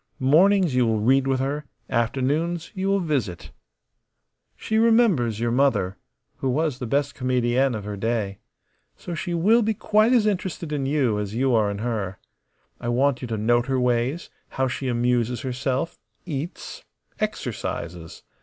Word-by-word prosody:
Mornings 175 +5 +4
you 125 -2 +3
will 110 -1 +1
read 130 +5 +3
with 135 -1 +1
her; 140 +3 -2 0.2
afternoons 140 +8 -1
you 190 0 -2
will 195 0 +2
visit. 135 - -2 1.1
She 220 0 0
remembers 215 - +3
your 120 0 0
mother, 120 -8 +2 0.4
who 135 - -1
was 145 0 0
the 125 - -4
best 140 +3 0
comedienne 125 0 +1
of 105 - -5
her 105 0 -5
day. 105 -2 -2 0.6
So 175 - -7
she 170 +1 -3
will 215 +8 +4
be 220 0 0
quite 215 +3 +3
as 240 -4 +4
interested 185 -5 -2
in 140 -2 -1
you 135 -7 +1
as 105 0 -4
you 130 +1 +2
are 110 -3 +3
in 100 - -3
her. 105 -4 -3 0.6
I - - -6
want 130 +1 +2
you 125 - -4
to 115 -1 -3
note 120 +3 +2
her 135 -1 +1
ways, 125 +6 0 0.2
how 130 0 -1
she 130 +1 -3
amuses 120 -1 0
herself, 130 +5 -2 0.3
eats, 155 0 -6 0.4
exercises. 85 -1 -4
130 Hz, 160 wpm, -24 LUFS, 120-160 Hz, 1.1 s, Mornings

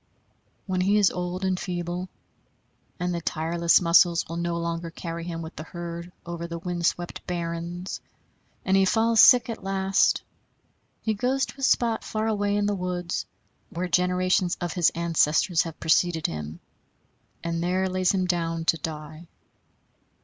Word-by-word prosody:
When 185 -2 -1
he 200 +3 +3
is 205 -2 +4
old 180 +1 -3
and 185 -1 0
feeble, 175 0 -4 0.9
and 180 0 -1
the 170 - -3
tireless 170 +1 +2
muscles 170 0 +4
will 165 - -5
no 170 0 -1
longer 170 0 -3
carry 165 0 -6
him 165 -1 -5
with 160 - -9
the - - -6
herd 170 +1 -7
over 170 0 -5
the 170 0 -5
wind 175 0 -1
swept 175 0 -3
barrens, 170 +1 -4 0.6
and 190 - +3
he 195 - +5
falls 225 +3 +3
sick 250 -2 +7
at 230 -4 -6
last, 195 0 +2 0.8
he 220 - +1
goes 255 +5 0
to 230 +5 -12
a - - -8
spot 235 -3 +2
far 215 0 -2
away 205 -2 0
in 205 0 +1
the 205 - +1
woods, 180 -2 -3 0.4
where 180 +2 -3
generations 180 +1 +2
of 175 -3 -3
his 175 -3 +4
ancestors 165 0 +2
have 165 -2 -6
preceded 165 0 +2
him, 75 +1 -4 0.8
and 170 0 -2
there 185 +2 +1
lays 185 0 +1
him 185 -2 0
down 165 -2 -1
to 165 - +3
die. 155 +1 -7
175 Hz, 160 wpm, -26 LUFS, 170-190 Hz, 0.9 s, sick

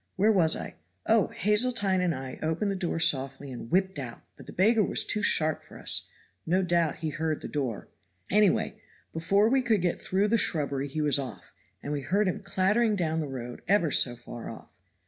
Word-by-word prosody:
Where 210 +4 +4
was 170 -6 +3
I? - - -6 0.3
Oh. 220 -2 +3
Hazeltine 210 -3 +1
and 175 -4 +1
I 130 0 -7
opened 160 +6 -1
the - - -2
door 175 -3 -2
softly 135 -3 0
and 120 -2 -8
whipped 190 -2 +1
out, 120 -4 -7
but - - -14
the - - -8
beggar 215 +4 +3
was - - +2
too 210 - -1
sharp 155 -5 +1
for - - -14
us. - - -1 0.4
No 185 +3 +1
doubt 170 -3 +1
he - - 0
heard 155 0 -3
the - - -4
door. 130 -8 -3 0.4
Anyway, 205 -1 +2 0.3
before 195 +6 +2
we 265 +3 +3
could 220 -7 +1
get 175 - -1
through 195 +3 +1
the 230 +1 +3
shrubbery 140 -5 -1
he 155 +3 -3
was 145 -1 +3
off, 135 -2 -8 0.3
and 145 - -3
we 145 - -2
heard 200 +9 +1
him 185 - -1
clattering 200 +3 +1
down 160 -4 -1
the 155 - -2
road 125 -3 -7
ever 175 -5 +3
so 120 -2 +4
far 120 0 -9
off. - - -11
175 Hz, 205 wpm, -28 LUFS, 145-205 Hz, 0.4 s, Where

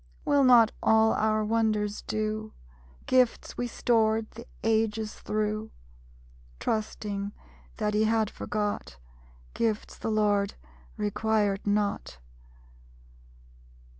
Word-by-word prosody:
Will 285 -1 +4
not 240 -4 +7
all 220 0 +4
our 215 0 +1
wonders 215 -2 0
do? 215 0 -3 0.5
Gifts 255 -2 +2
we 245 - -2
stored 225 -2 +1
the 230 +2 -11 0.2
ages 220 -1 0
through, 215 +1 -2 0.9
(Trusting 205 -2 -3 0.4
that 210 -1 -1
He 215 +1 +3
had 220 -1 +1
forgot) 205 - -3 0.6
Gifts 225 -2 -2
the - - -3
Lord 205 -2 +1 0.4
requirèd 210 -1 0
not? 205 - -1
215 Hz, 95 wpm, -28 LUFS, 210-220 Hz, 0.9 s, not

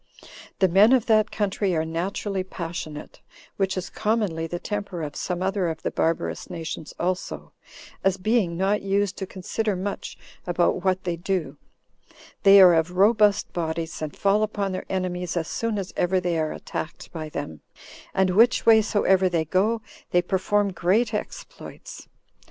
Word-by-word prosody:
The 190 - +4
men 200 +7 +6
of 255 -4 +3
that 215 -2 +3
country 200 -2 -1
are 160 0 0
naturally 185 +4 -2
passionate, 165 -4 -7 0.4
which 190 -1 0
is 185 - -4
commonly 210 -7 -1
the 175 - -4
temper 200 -3 -4
of 150 -1 -6
some 180 0 -3
other 190 -1 0
of 160 -1 -6
the - - -1
barbarous 85 - -1
nations 165 -3 -6
also, 180 +1 -3 0.5
as 195 -1 +2
being 190 -4 +1
not 195 +3 +1
used 200 0 0
to 190 - -4
consider 200 +3 -2
much 195 +2 -5 0.3
about 175 +1 +1
what 190 -1 +1
they 175 -2 -2
do; 170 -5 -2 0.9
they 195 0 +8
are 185 -2 +9
of 165 +2 0
robust 210 0 +4
bodies 165 -1 -3
and 155 -2 -4
fall 200 +1 +2
upon 205 -2 -1
their 185 - -4
enemies 180 -2 -2
as 160 -2 -1
soon 230 -2 -2
as 195 -2 -5
ever 185 +1 +2
they 175 -2 -1
are 155 -1 -1
attacked 160 - -6
by 155 -2 -6
them; 80 - -6 0.5
and 190 -1 +2
which 230 +6 +4
way 225 -1 +7
soever 190 -3 +2
they 165 -2 0
go, 215 +7 +1 0.3
they 175 0 +2
perform 200 +2 +1
great 205 +7 +1
exploits. 210 - -7
185 Hz, 165 wpm, -24 LUFS, 170-205 Hz, 0.9 s, are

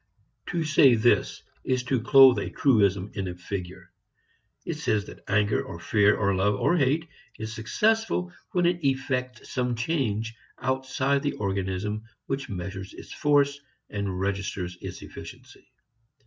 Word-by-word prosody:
To 170 -3 -1
say 145 -5 +6
this 115 +2 +2 0.2
is 130 -1 0
to 125 -1 0
clothe 130 -2 +7
a - - -3
truism 100 -6 +2
in 95 -2 -3
a 90 - -5
figure. 90 0 -7 0.7
It - - -3
says 105 -2 0
that - - -12
anger 105 +1 +2
or 85 - -8
fear 105 +3 +3
or 100 -2 +1
love 100 +2 +2
or 170 - +2
hate 155 +2 +1 0.3
is 110 0 -5
successful 185 - 0 0.2
when 180 -1 +2
it 175 -1 +1
effects 130 -2 -1
some 125 -2 0
change 115 -4 -1 0.2
outside 130 +2 0
the 145 0 -1
organism 100 +1 -2 0.2
which 135 0 -3
measures 95 0 -6
its - - -10
force 145 -1 +2 0.3
and 100 -3 -3
registers 95 -2 -2
its - - -7
efficiency. - - -12
115 Hz, 145 wpm, -26 LUFS, 100-135 Hz, 0.7 s, clothe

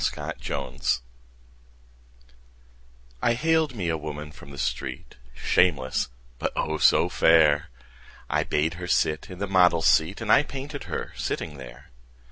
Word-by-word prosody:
My - - -4
Madonna 65 +1 -5 2.4
I 120 - +3
haled 160 0 +1
me 95 -6 -3
a 80 - +1
woman 75 0 -6
from 70 - -14
the 70 - -10
street, 65 -1 -4 0.2
Shameless, 65 -3 +1 0.3
but, - - -1
oh, 80 0 -1
so - - +5
fair! 80 -2 +4 0.6
I - - +1
bade 75 +2 0
her 90 - -4
sit 75 -3 +1
in 90 - -8
the 100 - -2
model's 90 -4 +4
seat 80 +5 +3
And 110 -2 -1
I - - +7
painted 145 0 -7
her - - -5
sitting 75 -2 -4
there. 60 -3 -12
80 Hz, 140 wpm, -25 LUFS, 75-100 Hz, 2.4 s, I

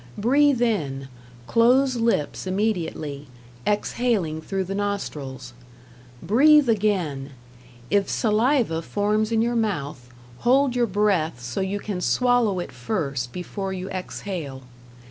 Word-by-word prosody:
Breathe 270 +3 +3
in, 140 - -1 0.4
close 250 - +3
lips 225 -9 0
immediately, 170 -8 -2 0.4
exhaling 205 -6 0
through 195 +4 -2
the 190 +1 -5
nostrils. 145 -11 -4 0.7
Breathe 290 +6 +5
again; 180 -11 0 0.6
if 200 -1 +2
saliva 225 - +1
forms 210 +4 0
in 225 0 +2
your 240 +1 0
mouth, 145 - -2 0.3
hold 260 +1 +3
your 240 -1 +2
breath 190 - +1
so 125 +6 -4
you 190 +2 -1
can 200 -3 -4
swallow 245 -3 +2
it 175 - -4
first 140 - -3
before 190 - -5
you 185 0 -5
exhale. 175 -7 -5
200 Hz, 115 wpm, -24 LUFS, 160-230 Hz, 0.7 s, Breathe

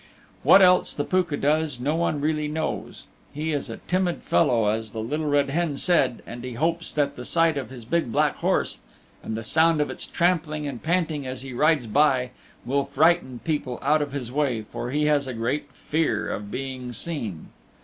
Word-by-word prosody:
What 195 - +7
else 180 0 +4
the 145 - -1
Pooka 175 -4 0
does 150 -2 +1
no 145 +5 0
one 165 -3 0
really 150 0 0
knows. 155 +1 -4 0.3
He 155 +2 -2
is 145 -3 -2
a 115 - -6
timid 180 -1 0
fellow 120 -9 +3
as 110 0 -2
the 110 - -4
Little 150 +8 -2
Red 145 -1 +2
Hen 160 -2 0
said, 140 -8 +2
and 120 +1 -8
he 125 -1 -5
hopes 165 +6 -1
that 145 -1 0
the 125 - -7
sight 165 +3 +2
of 140 -2 -4
his 125 -3 -10
big 160 -1 0
black - - +2
horse - - 0 0.4
and 110 - -4
the 115 - -5
sound 160 +6 +3
of 150 - 0
its - - -6
trampling 160 -4 0
and 135 -5 -5
panting 160 -5 0
as 130 0 -5
he 135 -2 -7
rides 150 0 +3
by 130 +1 +2 0.3
will 140 +3 +1
frighten 155 -5 +2
people 145 -6 -2
out 150 +2 +3
of 145 -1 -3
his 130 -4 -4
way, 130 -6 0
for 120 - -6
he 150 +3 0
has 145 -2 +2
a 130 - -4
great 125 +6 -2
fear 150 -4 -1
of 100 0 -5
being 130 0 -5
seen. 115 - -5
145 Hz, 200 wpm, -25 LUFS, 125-160 Hz, 0.4 s, What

